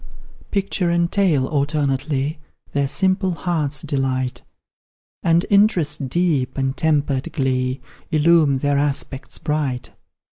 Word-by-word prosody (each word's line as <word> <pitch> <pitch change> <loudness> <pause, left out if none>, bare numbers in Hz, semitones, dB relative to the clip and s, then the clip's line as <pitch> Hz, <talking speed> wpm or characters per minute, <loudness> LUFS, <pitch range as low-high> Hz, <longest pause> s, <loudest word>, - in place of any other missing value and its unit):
Picture 195 -3 0
and 170 0 +1
tale 170 -10 +2
alternately 145 0 -1 0.3
Their 140 -1 0
simple 185 +5 +1
hearts 150 -3 -1
delight, 130 -4 -1 0.8
And 170 +1 +3
interest 170 -9 +3
deep, 155 -5 0
and 135 0 -1
tempered 145 -4 0
glee, 130 -1 -1 0.3
Illume 155 -2 +4
their 145 +1 +1
aspects 140 -1 -2
bright. 150 -5 -2
145 Hz, 105 wpm, -21 LUFS, 135-170 Hz, 0.8 s, Illume